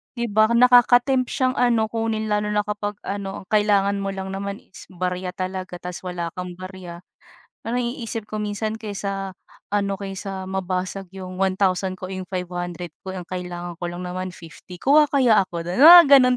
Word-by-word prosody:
'di 235 Hz, -3 st, -3 dB
ba, 215 Hz, +1 st, +5 dB
nakakatempt 245 Hz, +2 st, +5 dB
siyang 255 Hz, 0 st, 0 dB
ano, 230 Hz, -3 st, +2 dB
kunin 220 Hz, -1 st, -2 dB
lalo 210 Hz, 0 st, +1 dB
na 210 Hz, 0 st, +1 dB
kapag 205 Hz, 0 st, -4 dB
ano, 195 Hz, -1 st, -5 dB
ang -, -, -28 dB
kailangan 200 Hz, -1 st, +3 dB
mo 195 Hz, 0 st, -3 dB
lang 190 Hz, 0 st, -5 dB
naman 200 Hz, +1 st, -5 dB
is -, -, -14 dB
barya 180 Hz, 0 st, -4 dB
talaga 185 Hz, -1 st, -4 dB
tapos 180 Hz, +1 st, -7 dB
wala 170 Hz, -2 st, -4 dB
kang 180 Hz, -1 st, -7 dB
barya. 185 Hz, -1 st, -9 dB, 0.6 s
Parang 245 Hz, +2 st, 0 dB
naiisip 235 Hz, -3 st, -4 dB
ko 215 Hz, -, -3 dB
minsan 215 Hz, +1 st, -3 dB
kaysa 195 Hz, -2 st, -4 dB, 0.4 s
ano, 200 Hz, -1 st, +1 dB
kaysa 195 Hz, -1 st, -6 dB
mabasag 185 Hz, 0 st, -3 dB
'yong 185 Hz, 0 st, -6 dB
₱1,000 185 Hz, -1 st, +1 dB
ko, 185 Hz, -, -6 dB
iyong 185 Hz, 0 st, -5 dB
₱500 175 Hz, -2 st, -5 dB
ko, 190 Hz, -, -6 dB
eh, 190 Hz, -, -5 dB
ang 175 Hz, -, -8 dB
kailangan 175 Hz, -1 st, -6 dB
ko -, -, -1 dB
lang 180 Hz, +1 st, -6 dB
naman 185 Hz, +1 st, -4 dB
₱50, 175 Hz, +1 st, -12 dB
kuha 295 Hz, +2 st, +4 dB
kaya 255 Hz, -6 st, +4 dB
ako 170 Hz, -2 st, -6 dB
do'n? 185 Hz, +10 st, 0 dB
Mga 345 Hz, +2 st, +12 dB
gano'n 255 Hz, -3 st, +6 dB
195 Hz, 180 wpm, -23 LUFS, 185-220 Hz, 0.6 s, Mga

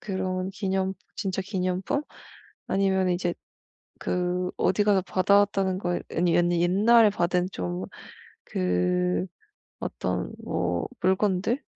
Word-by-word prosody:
그런 190 Hz, -4 st, -2 dB
기념 190 Hz, -1 st, -1 dB, 0.2 s
진짜 195 Hz, -1 st, -2 dB
기념품? 185 Hz, +7 st, -1 dB, 0.6 s
아니면 190 Hz, -1 st, +2 dB
이제 175 Hz, 0 st, 0 dB, 0.7 s
그 180 Hz, 0 st, -1 dB
어디 205 Hz, +2 st, +2 dB
가서 205 Hz, -2 st, +4 dB
받아 195 Hz, +2 st, +3 dB
왔다는 195 Hz, -2 st, 0 dB
거 175 Hz, -2 st, -1 dB, 0.2 s
아니 175 Hz, 0 st, +3 dB
아니 175 Hz, 0 st, +2 dB
옛날에 210 Hz, +5 st, +5 dB
받은 180 Hz, -1 st, 0 dB
좀 90 Hz, -, -4 dB, 0.6 s
그 90 Hz, 0 st, 0 dB, 0.5 s
어떤 -, -, -3 dB
뭐 85 Hz, -1 st, -1 dB
물건들? 190 Hz, +6 st, +1 dB
185 Hz, 215 characters per minute, -26 LUFS, 175-195 Hz, 0.7 s, 옛날에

